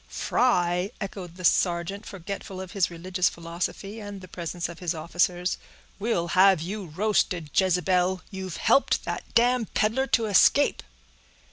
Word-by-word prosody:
"Fry!" 180 -6 +1
echoed 190 -4 -6
the 180 -1 -6
sergeant, 175 +4 +1
forgetful 195 0 -7
of 190 -1 -7
his 195 -3 +1
religious 180 +2 0
philosophy, 175 +5 -5
and 205 -2 -7
the 185 - -11
presence 175 0 -4
of 170 -1 -10
his 175 -2 -2
officers. 175 +2 0 0.4
"We'll 195 -6 -1
have 190 0 +5
you 190 +4 -5
roasted, 175 -3 0
Jezebel!—you've 185 0 0
helped 275 - +3
that - - -5
damned 240 -1 +2
peddler 235 +6 +1
to 230 -4 +2
escape." 205 -3 +4
185 Hz, 135 wpm, -26 LUFS, 175-200 Hz, 0.4 s, have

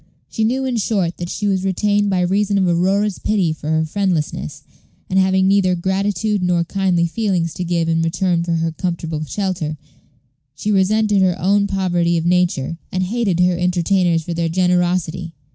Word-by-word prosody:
She 220 - -2
knew, 260 +4 0
in 255 -2 -1
short, 195 -5 -1
that 175 0 -5
she 210 - -3
was 190 -2 +1
retained 205 +2 +1
by 185 -2 +1
reason 200 +3 +1
of 190 -2 +2
Aurora's 190 +4 +1
pity 190 -7 0
for 155 -1 -7
her 160 0 +1
friendlessness; 155 -5 -2 0.5
and, 190 - +3
having 190 0 +3
neither 195 -2 +3
gratitude 195 +3 -1
nor 180 -1 +1
kindly 180 -1 0
feelings 175 -3 -1
to 180 - -4
give 170 -1 0
in 165 0 +1
return 170 +1 0
for 170 0 -2
her 165 0 -1
comfortable 165 -2 -3
shelter, 170 -3 -3 0.8
she 210 - -2
resented 205 +1 +2
her 185 -1 +1
own 200 +2 +2
poverty 175 -3 0
of 165 - -2
nature, 175 -3 0
and 185 0 -1
hated 200 -3 -1
her 180 0 +3
entertainers 180 -1 +1
for 170 - -4
their 165 0 -1
generosity. 180 -1 0
180 Hz, 175 wpm, -19 LUFS, 170-195 Hz, 0.8 s, and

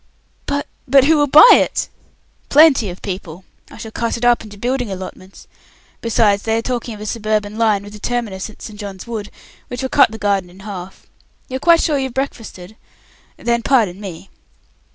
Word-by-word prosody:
"But 285 0 -1 0.2
but 270 +1 +5
who 315 +4 +4
will 290 -1 +2
buy 300 - +9
it?" - - +3 0.6
"Plenty 285 -8 +5
of 180 - -10
people. 185 -3 -6 0.3
I - - -13
shall 220 -1 -8
cut 230 +1 -2
it 235 - -3
up 240 -1 +3
into 205 -2 -12
building 245 +1 -2
allotments. 185 0 -9 0.6
Besides, 215 -3 +2
they 225 +1 0
are - - 0
talking 240 -2 -3
of 210 - -12
a - - -6
suburban 215 -1 -2
line, 215 -3 +1
with 205 0 -11
a 210 - -10
terminus 220 -5 -3
at 215 - -14
St. 210 -2 -9
John's 200 -3 -7
Wood, 220 -3 -5 0.4
which 245 +1 -6
will 260 - -2
cut 280 - +5
the 220 - -8
garden 200 -3 0
in 185 +2 -16
half. 195 -2 -9 0.4
You 260 - -3
are - - -9
quite 335 +3 +4
sure 295 -4 +1
you've 265 -2 -4
breakfasted? 220 -7 -5 0.6
Then 235 0 0
pardon 220 -8 +1
me." 195 -1 -9
220 Hz, 195 wpm, -18 LUFS, 200-250 Hz, 0.6 s, buy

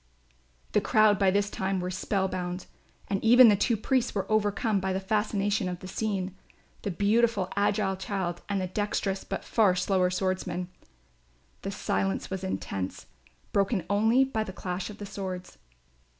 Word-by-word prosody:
The - - +3
crowd 215 -2 +4
by 195 -2 +4
this 205 +2 +1
time 190 0 -1
were 180 0 -3
spell 190 +1 0
bound 180 -1 -4 0.4
and 195 -1 -2
even 240 +1 +8
the 205 - +5
two 225 +3 +1
priests 255 +2 0
were 195 -1 0
overcome 210 0 +2
by 190 0 -1
the 190 - 0
fascination 205 -1 0
of 180 - -4
the 185 - -10
scene, 195 -2 -2 0.5
the - - -3
beautiful 205 +1 +2
agile 200 -1 +1
child 185 -3 -3
and 200 -1 0
the 185 - -1
dexterous 195 0 -2
but 195 - -5
far 205 -5 +3
slower 185 0 +2
swordsman. 185 -1 -2 0.9
The - - -4
silence 95 - -1
was 190 0 -3
intense, 95 - -4 0.5
broken 200 -1 +1
only 225 +6 +4
by 245 -5 -1
the 190 - -7
clash 180 0 -4
of 210 - -9
the 205 - -7
swords. 185 - -6
195 Hz, 165 wpm, -28 LUFS, 185-210 Hz, 0.9 s, even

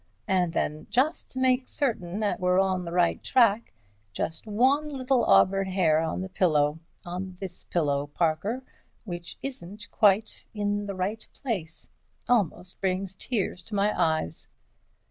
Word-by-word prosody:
And 180 -3 +2
then, 155 -1 -2
just 280 +7 +1
to 260 - -5
make 255 0 +2
certain 210 -8 -2
that 210 - 0
we're 180 0 +3
on 190 -2 +1
the 170 - -5
right 175 -1 +2
track, 230 -3 +3 0.4
just 165 - -3
one 265 +8 +2
little 265 -3 +1
auburn 190 - +4
hair 175 -5 +3
on 160 +2 -2
the 190 - -4
pillow, 155 -5 +2 0.3
on 180 +1 -5
this 185 -2 -5
pillow, 145 -4 0
Parker, 175 - -1 0.4
which 175 -4 -7
isn't 210 -5 -7
quite 210 +1 +2
in 205 0 -1
the 200 - -4
right 200 +4 -3
place. 190 - -4 0.4
It - - -6
almost 185 -5 0
brings 190 0 -1
tears 190 -3 -2
to 215 - -6
my 205 +1 +2
eyes." 160 - 0
190 Hz, 150 wpm, -27 LUFS, 175-220 Hz, 0.4 s, auburn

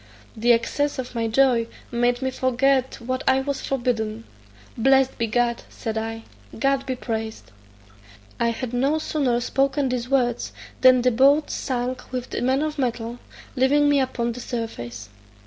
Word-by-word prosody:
The 235 +2 +3
excess 280 +6 +1
of 255 -1 -5
my 230 -1 -1
joy 235 -1 +3 0.2
made 245 +1 +1
me 260 - 0
forget 260 +1 +1
what 255 +2 -3
I 265 0 +4
was 280 0 -3
forbidden: 230 -4 -2 0.5
"Blessed 265 +2 +3
be 230 - +1
God," 235 +1 +1
said 220 -1 -5
I; 225 0 -4 0.3
"God 275 +2 +1
be 260 - -1
praised." 220 - -5 0.9
I 235 - +2
had 235 +1 -3
no 275 +5 +2
sooner 275 -6 0
spoken 270 +2 +1
these 250 -1 -2
words, 245 -3 0 0.3
than 255 -1 +6
the 250 - +4
boat 280 +5 +4
sunk 255 -1 -3
with 255 -1 -4
the - - -2
man 265 +3 +2
of 305 -1 -3
metal, 240 -2 -2 0.4
leaving 285 +3 +3
me 285 -1 +4
upon 250 -3 -1
the 240 - -7
surface. 120 - -5
250 Hz, 160 wpm, -23 LUFS, 235-270 Hz, 0.9 s, than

